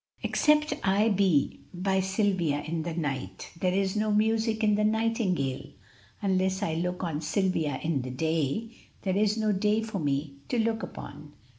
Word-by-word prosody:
"Except 300 0 +3
I 200 +3 +3
be 190 -8 +2 0.2
by 190 +2 +1
Silvia 190 -6 +1
in 165 +1 -2
the 165 0 -4
night, 135 - -4
There 180 +1 +2
is 190 +1 0
no 215 0 +1
music 220 +1 +1
in 210 -1 +4
the 210 +1 +2
nightingale; 215 - 0 0.5
Unless 190 0 +1
I 165 - 0
look 180 +3 -2
on 160 -3 -2
Silvia 165 -5 0
in 155 -4 0
the 130 - -5
day, 160 - -1 0.3
There 190 -2 0
is 210 +1 +2
no 215 -1 +1
day 210 +2 +1
for 220 -3 -4
me 140 -1 -1
to 245 - 0
look 225 0 +1
upon." 150 -1 -9
190 Hz, 165 wpm, -28 LUFS, 160-215 Hz, 0.5 s, in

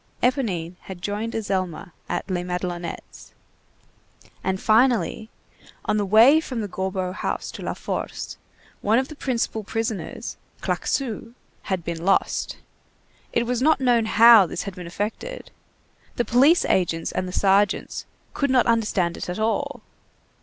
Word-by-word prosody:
Éponine 190 - 0
had 190 -2 -9
joined 210 +5 -3
Azelma 185 -6 -2 0.2
at - - -2
Les 180 -2 -2
Madelonettes. 180 -1 -5 1.1
And 190 0 -1
finally, 225 0 +2 0.6
on 210 - +1
the 205 -1 0
way 230 +10 +7
from 255 -7 -4
the 210 - -3
Gorbeau 190 -1 -2
house 210 - -3
to - - -9
La - - -3
Force, - - -4 0.5
one 215 +3 +3
of 260 +1 0
the 310 - -8
principal 235 -5 -2
prisoners, 225 +1 -4 0.2
Claquesous, 235 -3 -2 0.3
had 190 -3 -1
been 165 0 -4
lost. 195 +2 +1 0.7
It 235 - +1
was 245 0 -1
not 310 +2 +4
known 240 -3 +3
how 225 -2 +8
this - - -4
had 200 - -6
been 180 -1 -8
effected, 205 +5 -5 0.6
the 240 - 0
police 275 +9 +5
agents 165 -3 +1
and 185 - -2
the - - -5
sergeants 195 +1 +1 0.3
"could 280 - 0
not 255 -1 +4
understand 210 -7 +1
it - - -5
at 180 - -3
all." 225 +6 -1
210 Hz, 145 wpm, -24 LUFS, 185-235 Hz, 1.1 s, how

